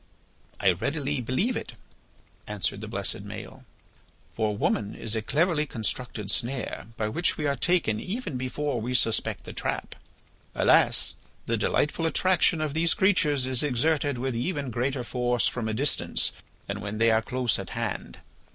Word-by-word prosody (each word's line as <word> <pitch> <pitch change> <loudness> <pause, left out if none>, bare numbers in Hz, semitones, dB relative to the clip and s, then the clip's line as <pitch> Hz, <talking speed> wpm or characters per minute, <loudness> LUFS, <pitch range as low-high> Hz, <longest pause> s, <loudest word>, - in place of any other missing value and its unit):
"I 95 - +5
readily 140 - -1
believe 160 - 0
it," 225 - -5 0.7
answered - - -1
the - - -6
blessed - - -3
Maël. - - -9 0.7
"For 105 -2 0
woman 105 0 0
is 110 0 -2
a 110 - 0
cleverly 150 - +1
constructed 110 -3 -3
snare 120 -5 -2
by 110 - 0
which 170 +11 +1
we 150 - -2
are 140 -1 +2
taken 165 -11 +2
even 185 - -4
before 130 0 -2
we 125 +3 -2
suspect 115 -2 +1
the - - -8
trap. - - -3 0.6
Alas! - - +4 0.3
the - - +1
delightful 165 +2 +1
attraction 175 -1 +3
of 155 -2 -1
these 165 +2 +2
creatures 160 - +3
is 130 -1 +1
exerted 145 +1 +1
with 130 0 -2
even 140 +1 -2
greater 125 +3 -1
force 120 0 +1
from 115 -3 -2
a - - -1
distance 135 +4 +1 0.3
than 100 +1 -4
when 105 +1 -4
they 115 +1 +4
are 110 0 +4
close 125 0 0
at - - -6
hand. - - -3
130 Hz, 160 wpm, -27 LUFS, 115-150 Hz, 0.7 s, I